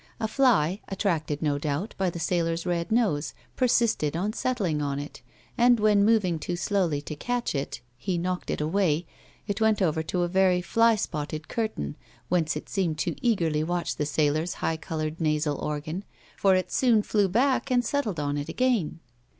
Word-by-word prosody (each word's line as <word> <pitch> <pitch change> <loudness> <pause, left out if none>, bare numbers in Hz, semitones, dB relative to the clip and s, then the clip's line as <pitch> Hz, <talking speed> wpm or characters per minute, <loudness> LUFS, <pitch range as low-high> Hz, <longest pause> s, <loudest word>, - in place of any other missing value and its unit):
A 220 - 0
fly, 215 - +2
attracted, 165 -7 -1
no 145 -2 +1
doubt, 150 +8 -2
by 190 -2 0
the 170 - -6
sailor's 165 0 0
red 175 0 -1
nose, 190 -11 +1 0.2
persisted 235 - +2
on 205 +5 -1
settling 195 -13 -1
on 140 -1 -1
it, 145 -1 -7 0.4
and 240 0 +5
when 210 -1 +4
moving 200 -6 +3
too 175 +3 -3
slowly 175 -5 0
to 150 - -6
catch 245 +9 -2
it 140 -1 -3 0.2
he 180 +8 -1
knocked 180 +1 -2
it - - -1
away, 165 0 +1 0.4
it 205 +1 -3
went 220 -2 +3
over 160 -5 +1
to 160 +3 -1
a - - +1
very 185 0 +3
fly 230 +6 +3
spotted 155 -5 -4
curtain 215 - -3 0.3
whence 165 -4 +1
it 150 - -6
seemed 175 -6 -1
to 145 - -1
eagerly 165 -10 +1
watch 175 0 -2
the 150 - -1
sailor's 155 +3 0
highly 160 -1 -2
coloured 160 -1 -4
nasal 150 -2 0
organ, 155 +5 -3 0.3
for 195 -1 +4
it 185 - -1
soon 235 -5 +3
flew 205 -2 +2
back 260 +7 +2
and 245 -1 +2
settled 225 - -1
on 145 0 -1
it 145 - -5
again. 235 -11 0
175 Hz, 180 wpm, -27 LUFS, 155-210 Hz, 0.4 s, and